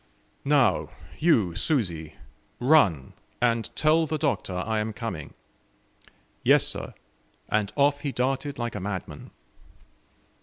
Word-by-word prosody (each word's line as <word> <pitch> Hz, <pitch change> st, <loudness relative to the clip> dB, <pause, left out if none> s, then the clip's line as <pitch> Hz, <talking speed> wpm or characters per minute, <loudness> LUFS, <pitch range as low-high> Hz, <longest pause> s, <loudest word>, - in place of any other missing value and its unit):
"Now, 140 Hz, -5 st, +3 dB, 0.3 s
you 115 Hz, -, +3 dB
Susi, 85 Hz, -, -1 dB, 0.4 s
run, 115 Hz, -, +3 dB, 0.3 s
and 115 Hz, -2 st, +1 dB
tell 160 Hz, +1 st, +3 dB
the 155 Hz, +1 st, -1 dB
Doctor 135 Hz, -11 st, -1 dB
I 110 Hz, +4 st, -1 dB
am 110 Hz, +1 st, -2 dB
coming." 105 Hz, -10 st, -6 dB, 1.1 s
"Yes, -, -, +5 dB
sir," -, -, -3 dB, 0.5 s
and 105 Hz, -1 st, 0 dB
off 145 Hz, 0 st, +3 dB
he 145 Hz, -1 st, -3 dB
darted 135 Hz, +3 st, -2 dB
like 120 Hz, -1 st, -3 dB
a 105 Hz, -, -4 dB
madman. 95 Hz, -6 st, -6 dB
120 Hz, 115 wpm, -26 LUFS, 95-145 Hz, 1.1 s, Yes